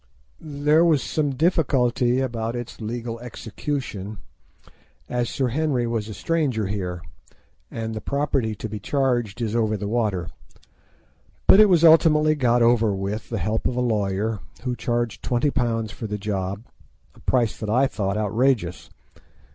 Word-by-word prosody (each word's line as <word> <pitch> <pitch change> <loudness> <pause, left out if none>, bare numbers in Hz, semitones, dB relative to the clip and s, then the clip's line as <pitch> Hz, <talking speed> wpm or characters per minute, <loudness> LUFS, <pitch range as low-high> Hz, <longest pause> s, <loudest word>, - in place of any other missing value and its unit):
There 150 +1 +2
was 160 -5 +3
some 145 -3 -1
difficulty 130 -5 +2
about 115 -2 -2
its 120 -1 -7
legal 115 +1 -4
execution, 115 -3 -5 0.9
as 120 -1 -1
Sir 130 -2 -1
Henry 135 -2 0
was 115 -2 -2
a 105 - -7
stranger 140 - 0
here, 90 -3 -4 0.7
and 110 0 -4
the 110 - -5
property 140 -6 -1
to 110 - -5
be 105 0 -6
charged 120 -3 -1
is 110 0 -2
over 110 -2 +1
the 100 0 -4
water; 105 -7 -1 1.2
but 195 - +7
it 215 -1 +7
was 170 -3 +4
ultimately 155 -2 +6
got 120 -5 +2
over 115 -2 +4
with 100 +3 -4
the 115 - -2
help 105 +4 -1
of 125 - -3
a - - -1
lawyer, 105 -2 0 0.2
who 125 -1 -2
charged 120 -1 -2
£20 120 -4 0
for 110 - -6
the 105 0 -3
job—a 100 +1 -7
price 120 -4 +2
that 110 - -5
I 125 +5 +4
thought 100 -5 -2
outrageous. 110 -3 0
120 Hz, 145 wpm, -23 LUFS, 105-135 Hz, 1.2 s, but